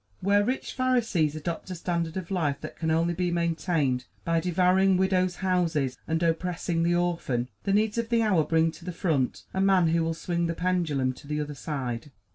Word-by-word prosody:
Where 200 +2 +3
rich 255 +5 -2
Pharisees 230 - +1
adopt 165 +4 -4
a 185 - -4
standard 170 -1 -2
of 185 0 -6
life 150 -7 0
that 155 - -7
can 160 - -2
only 165 +2 +2
be 180 +1 -1
maintained 165 -6 0 0.2
by 165 0 +2
devouring 185 +2 +3
widows' 185 -1 +2
houses 165 -8 +1
and 160 +1 0
oppressing 170 0 0
the 170 +1 +2
orphan, 165 -9 -1 0.2
the 195 - +1
needs 215 +2 +2
of 230 -1 -2
the 230 -1 +3
hour 190 -7 +3
bring 160 +1 +2
to 170 - -14
the 180 0 -5
front 155 -7 0
a 190 - 0
man 190 -4 +4
who 165 0 +2
will 165 0 -1
swing 170 0 -1
the 165 - -2
pendulum 165 -8 0
to 140 - -15
the 150 +1 -2
other 150 0 -3
side. 135 -4 -4
170 Hz, 200 wpm, -27 LUFS, 160-185 Hz, 0.2 s, man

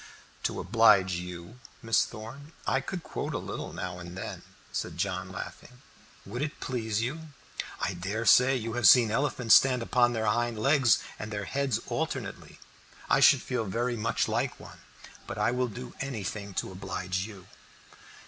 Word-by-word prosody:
"To - - -5
oblige 100 -2 +5
you, 90 +6 -8 0.2
Miss 115 0 +3
Thorn, 130 +8 -10
I 135 - +1
could 175 +5 -5
quote - - -4
a - - +1
little - - -5
now 90 -1 -5
and 85 +1 -9
then," - - -6 0.3
said 80 - -4
John, 90 0 -2
laughing. 100 +7 -9 0.4
"Would 120 +6 -5
it 150 0 -3
please 110 -4 -2
you? 160 +6 -4 0.5
I 95 - -1
dare 100 +6 -3
say 125 +6 +6
you 115 -2 -3
have 120 -4 +4
seen 115 +1 +7
elephants 125 -2 +2
stand 125 -3 +6
upon 120 0 +3
their 110 -1 -1
hind 120 +2 +1
legs 135 +1 +4 0.2
and 105 - -5
their 105 -2 -4
heads 140 -3 0
alternately. - - -4 0.5
I - - +5
should 140 -3 +6
feel 125 -3 -2
very 120 +5 -1
much 115 0 0
like - - -1
one; - - -12 0.5
but - - -5
I - - +2
will 125 0 0
do 120 +2 -8
anything 105 -6 -4
to - - -2
oblige 95 0 -3
you." 100 -4 -12
115 Hz, 165 wpm, -29 LUFS, 95-125 Hz, 0.5 s, seen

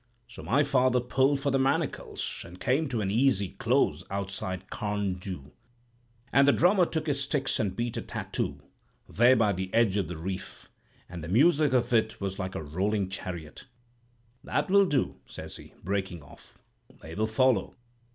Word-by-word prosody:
"So 115 - -11
my 140 +5 +2
father 130 -3 +3
pulled 135 +3 +1
for 140 - 0
the 135 - +2
Manacles, 135 +1 -1
and 90 +2 -12
came 140 +4 +1
to 120 -4 -1
an 95 -1 -1
easy 110 -4 +2
close - - +1
outside 95 -1 -4
Carn 105 -3 -2
Du. 90 -7 -7 0.8
And 140 +2 +6
the - - +8
drummer 180 0 +4
took 160 -1 -3
his 140 -3 0
sticks 135 -1 -1
and 95 -3 -1
beat 120 +1 -2
a - - -2
tattoo, 70 0 -4 0.4
there 120 +4 +5
by 105 -4 +3
the 95 +1 -4
edge 110 -4 +3
of 95 -5 0
the 85 0 -6
reef; 95 +4 -6 0.4
and 85 -2 -8
the - - -5
music 145 - +4
of 125 -1 +1
it 110 -1 +2
was 100 0 -4
like 95 0 -4
a - - -4
rolling 95 +6 -1
chariot. 85 -4 -7 0.8
"'That 185 - -1
will 200 -1 +6
do,' 140 -6 0
says - - -8
he, - - -14
breaking 95 -4 -3
off; - - -16 0.5
'they 80 - -8
will 110 +5 0
follow. 130 +3 +2
110 Hz, 175 wpm, -28 LUFS, 95-135 Hz, 0.8 s, the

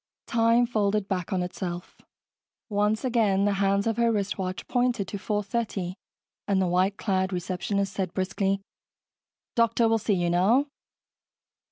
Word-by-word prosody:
Time 230 +1 +3
folded 210 -3 0
back 180 -4 -2
on 185 -2 +1
itself. 180 -1 -6 0.7
Once 210 +3 +1
again, 210 -6 +2
the 205 - +2
hands 200 0 +2
of 225 -1 0
her 235 -1 +3
wristwatch 195 -3 -2
pointed 245 -5 +1
to 205 - -4
4:30 205 -2 -2 0.5
and 200 -2 +2
the 190 - +2
white 185 +3 +1
clad 190 -2 0
receptionist 190 +2 -2
said 190 -2 -2
briskly, 195 +1 -1 0.9
"Doctor 230 0 +3
will 225 0 +2
see 210 -1 +1
you 175 -1 0
now." 210 +11 +4
200 Hz, 140 wpm, -26 LUFS, 190-225 Hz, 0.9 s, now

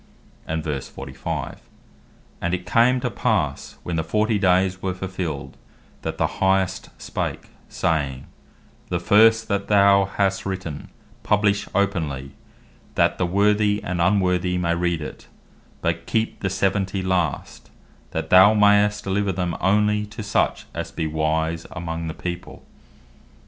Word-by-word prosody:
And 80 0 -2
verse 75 -4 -4
45. 65 -1 -6 0.8
"And 85 +1 0
it 90 0 -8
came 120 +5 +3
to - - -1
passe - - -1
when 85 -2 -3
the 80 - 0
forty 105 +5 +1
dayes 95 0 +2
were 95 -1 -2
fulfilled, 90 -6 -5 0.4
that - - -4
the - - -1
Highest 95 -1 +1
spake, - - -4 0.2
saying, 70 -5 -1 0.6
'The 90 - 0
first 110 +4 +5
that 100 -1 -1
thou 100 -1 +5
hast 100 -1 0
written, 95 -6 -5 0.3
publish 105 0 +1
openly, 80 -10 -1 0.6
that - - +2
the 90 - +1
worthy 105 +2 +2
and 90 -1 -2
unworthy 90 -1 +2
may 85 -1 +1
read 85 -1 0
it; 75 - -8 0.6
but 85 0 -1
keep 110 -1 -1
the 100 - -1
seventy 95 0 0
last, 90 -4 -2 0.4
that - - -4
thou 95 +4 +8
mayst 105 0 +4
deliver 100 0 0
them 90 -2 -2
onely 105 +2 +2
to 110 +1 -8
such 105 - 0
as - - -4
be 80 - -3
wise 80 +1 -1
among 85 -2 -4
the 80 - -5
people. 90 0 -6
95 Hz, 140 wpm, -23 LUFS, 85-100 Hz, 0.8 s, thou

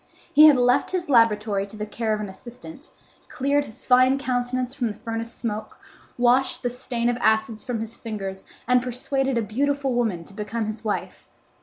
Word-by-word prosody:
He 305 +1 +9
had 295 -3 +6
left 245 0 +3
his 355 -4 -3
laboratory 210 -4 +3
to 215 - -10
the 210 - -3
care 220 +1 -3
of 215 - 0
an 210 - -4
assistant, 250 +9 -11 0.4
cleared 285 +2 0
his 220 - -12
fine 255 +1 +5
countenance 255 -1 -2
from 255 -4 -1
the 210 - -4
furnace 230 0 -5
smoke, 220 -3 -5 0.4
washed 250 +3 +2
the 245 - 0
stain 245 -1 -2
of 240 0 +1
acids 220 -1 +1
from 245 -3 -3
his 225 +1 -7
fingers, 195 -4 -6 0.2
and 250 0 +4
persuaded 260 +1 -1
a 230 - +1
beautiful 275 +4 0
woman 220 -8 0
to 195 - -13
become 215 +2 -3
his 215 +1 -6
wife. 215 -2 -4
240 Hz, 185 wpm, -24 LUFS, 215-255 Hz, 0.4 s, He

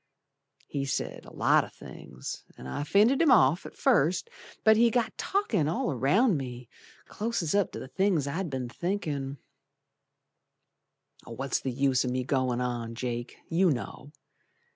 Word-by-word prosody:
He 140 -1 -3
said 140 - -3
a - - -12
lot - - +3
o' - - -8
things, 65 -1 -9
An' - - -10
I 65 - -3
fended 215 - +4
him 325 - +5
off 155 - +4
at - - -14
first, 230 - +2 0.3
But 220 0 +6
he 235 +2 +5
got 230 -1 0
talkin' 235 - 0
all 165 +1 0
around 165 - +3
me, 125 -3 -7 0.4
Clost 210 -8 -2
up 200 -3 +2
to - - -5
the - - -7
things 170 +1 +1
I'd 165 +5 -3
be'n 130 -3 -3
thinkin', 145 -3 -3 1.9
What's 135 +4 -2
the 135 - -3
use 130 0 +2
o' - - -2
me 125 +1 -1
goin' 130 -2 0
on, 120 -2 -3
Jake, 120 0 -4
You 180 +2 +3
know. 135 +2 -4
140 Hz, 155 wpm, -28 LUFS, 125-200 Hz, 1.9 s, But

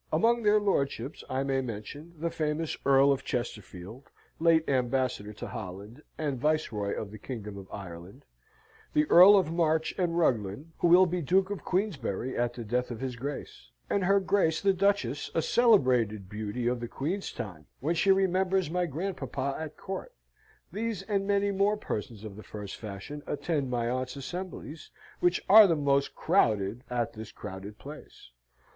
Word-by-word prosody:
Among 235 +1 +3
their 210 -1 +4
lordships 140 - -1
I 130 +1 0
may 135 -1 0
mention 130 +8 -7
the 165 +2 -2
famous 155 -1 -2
Earl 135 0 +6
of 135 - 0
Chesterfield, 110 -1 -5 0.3
late 165 -1 +4
Ambassador 125 -4 0
to 105 - -7
Holland, 105 +3 -8 0.2
and 145 -5 -2
Viceroy 120 -9 0
of 105 -2 -6
the 110 - -10
Kingdom 105 -4 -7
of 95 -1 -10
Ireland; 90 -1 -9 0.7
the 150 - +4
Earl 190 +4 +9
of 175 -5 +1
March 160 -1 +1
and 170 -2 0
Ruglen, 120 - 0
who - - +3
will 180 +2 +7
be 180 0 -2
Duke 190 +5 +2
of 205 - -5
Queensberry 140 - -2
at 120 0 -1
the 120 - -6
death 125 +3 -1
of 120 -3 -6
his 130 -1 -4
Grace; 140 +4 -7 0.2
and 200 - +1
her 200 +2 +4
Grace 190 -4 +2
the 195 -1 +3
Duchess, 185 -9 0
a 165 - +3
celebrated 125 - +3
beauty 105 +4 -4
of 125 0 +1
the 120 - -4
Queen's 175 - -3
time, 85 -8 -7
when 155 +6 0
she 185 +3 +3
remembers 190 -2 +2
my 180 0 0
grandpapa 140 -4 -3
at 155 -1 -6
Court. 485 - -6 0.6
These 220 -3 -3
and 195 -1 -1
many 200 0 +2
more 200 +2 +2
persons 110 - -5
of 105 -3 -8
the - - -8
first 105 -2 -8
fashion 110 +8 -7
attend 145 -3 -1
my 120 -1 -1
aunt's 130 +2 -2
assemblies, 165 +1 -7 0.3
which 175 0 +2
are 215 +1 +10
the 165 - +2
most 140 -2 +1
crowded 105 +2 +1
at 120 -2 -1
this 110 0 -9
crowded 105 0 -8
place. 145 - -12
140 Hz, 170 wpm, -29 LUFS, 115-180 Hz, 0.7 s, are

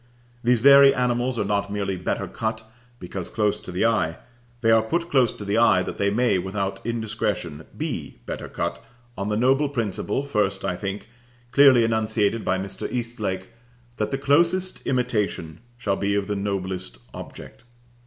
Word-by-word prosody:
These 120 -1 +3
very 140 +1 +8
animals 125 0 0
are 105 - 0
not 100 0 -1
merely 100 -2 -2
better 90 - -2
cut 110 0 -3 0.4
because 90 0 -6
close 105 -2 0
to - - -9
the 90 +5 0
eye; 105 -8 +1 0.4
they 115 -1 +4
are 115 0 +6
put 170 +10 -2
close 130 -5 +4
to 105 - -8
the 100 +3 +1
eye 100 -6 +5
that - - -6
they 100 - +2
may, 115 -2 +2
without 95 +1 -3
indiscretion, 105 -9 -3
be - - -4
better - - -5
cut, - - -3 0.3
on 100 +1 -3
the 105 - 0
noble 135 +5 +3
principle, 115 -1 -2
first 100 -8 -1
I 90 - -1
think, 100 +2 -5 0.4
clearly 135 -4 +7
enunciated 110 -1 +1
by 95 - +1
Mr. 95 +1 -5
Eastlake, 115 -5 -3 0.5
that 105 0 -1
the 135 - -1
closest 170 +7 +2
imitation 110 -10 -1 0.2
shall 100 -5 -1
be 100 0 0
of 100 -1 0
the 105 - -2
noblest 95 -3 -3 0.2
object. - - -10
110 Hz, 165 wpm, -24 LUFS, 100-125 Hz, 0.5 s, very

